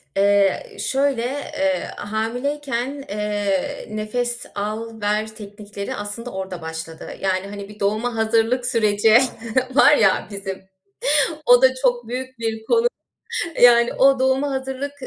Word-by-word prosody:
Eee, 200 - +2
şöyle, 270 -3 0
eee, 285 +1 -2
hamileyken, 250 +5 -3
eee, 205 -2 -2
nefes 240 +3 -3
al 220 +2 -4
ver 215 +1 -1
teknikleri 205 +2 -7
aslında 230 +4 -6
orada 190 -2 -6
başladı 160 0 -7
yani, 190 0 -1
hani, 200 0 -8
bir 210 0 -13
doğuma 215 +4 0
hazırlık 225 +3 +1
süreci 220 -2 +4 0.6
var 295 0 +7
ya 195 -8 +3
bizim, 195 -1 -7 0.8
o 245 +1 +7
da 260 0 +6
çok 245 -3 0
büyük 260 +1 -5
bir 225 -1 -3
konu. 465 - +3 0.8
Yani 235 -1 +7
o 270 0 +5
doğuma 265 +2 +1
hazırlık 265 +1 -4
225 Hz, 125 wpm, -21 LUFS, 205-260 Hz, 0.8 s, var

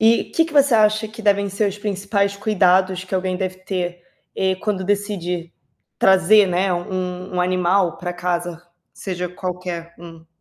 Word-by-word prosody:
e 225 +1 +4
que 330 - +1
que 325 - -9
você 280 -4 +4
acha 215 0 +3
que 225 +1 -10
devem 200 -1 +2
ser 200 +2 0
os 200 +1 -7
principais 200 0 -1
cuidados 190 -2 +2
que 185 - -6
alguém 185 0 -1
deve 185 -1 -4
ter, 180 -2 -4 0.3
eh, 190 0 +1
quando 190 -1 -2
decide 180 -4 -2 0.5
trazer, 190 +2 +5
né, 185 +1 0
u - - +1
um 180 +1 -4
um - - +2
animal 180 -1 +1
pra 175 0 -4
casa, 175 -1 -3 0.3
seja 180 -2 -4
qualquer 180 -2 -6
um? 165 -1 -12
185 Hz, 165 wpm, -21 LUFS, 180-200 Hz, 0.5 s, trazer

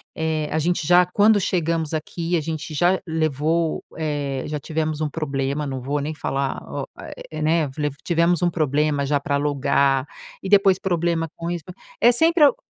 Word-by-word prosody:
eh, 160 -1 -1
a 160 - +1
gente 165 -1 0
já 180 0 +6
quando 205 +3 +4
chegamos 165 -3 -1
aqui, 170 +2 -2
a - - -1
gente 160 0 -5
já 175 +5 +3
levou, 160 +1 0
eh, 145 -4 -2
já 150 -1 -3
tivemos 155 +1 -2
um 155 - 0
problema. 140 -1 -2
Não 135 -2 -4
vou 140 +3 -2
nem 150 +2 -3
falar 135 -2 -2
o, - - -3 0.5
eh, 155 0 -5
né, 160 0 +2
lev 145 -1 -1
tivemos 170 0 +2
um 175 - +4
problema 150 -2 +1
já 145 0 +2
pra 140 0 -1
alugar 140 -1 +1 0.4
e - - -4
depois 195 -2 +5
problema 170 -3 0
com 170 0 -5
isso 175 -2 -3 0.4
é 240 - +6
sempre 325 +5 +4
al 285 - +6
155 Hz, 180 wpm, -22 LUFS, 145-170 Hz, 0.5 s, já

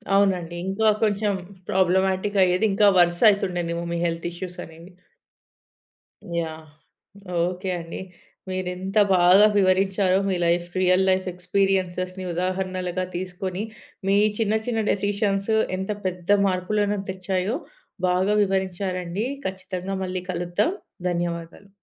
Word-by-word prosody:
అవునండి. 185 -4 +2
ఇంకా 215 +3 +1 0.2
కొంచెం 205 0 +1 0.4
ప్రాబ్లమాటిక్ 190 +2 +2
అయ్యేది. 185 +4 +2
ఇంకా 205 0 +5
వరుసయితుండేనేమో 175 -2 +2
మీ - - -1
హెల్త్ 165 0 -2
ఇష్యూస్ 180 0 -7
అనేవి. 165 +3 -14 1.5
యాహ్! 160 -1 -5 0.8
ఓకే 180 +2 -2
అండి. 165 0 -7 0.5
మీరింత 185 +2 -3 0.2
బాగా 180 +4 +7
వివరించారో 190 0 +3
మీ 185 - +1
లైఫ్ 175 +1 +1
రియల్ 185 +1 +4
లైఫ్ 185 0 +1
ఎక్స్‌పీరియన్సెస్‌ని 185 0 -1
ఉదాహరణలుగా 185 0 -2
తీసుకొని, 185 +2 -4 0.4
మీ 200 +1 +4 0.2
చిన్న 220 -2 +1
చిన్న 225 -2 0
డెసిషన్స్ 200 +1 0 0.3
ఎంత 190 +2 -3
పెద్ద 185 +2 +1
మార్పులను 200 +2 0
తెచ్చాయో, 185 +3 -1 0.5
బాగా 185 +3 +2
వివరించారండి. 190 0 -2 0.2
ఖచ్చితంగా 190 0 -5
మళ్ళీ 185 -1 -3
కలుద్దాం. 175 - 0 0.4
ధన్యవాదాలు. 170 +2 -4
185 Hz, 105 wpm, -24 LUFS, 180-195 Hz, 1.5 s, బాగా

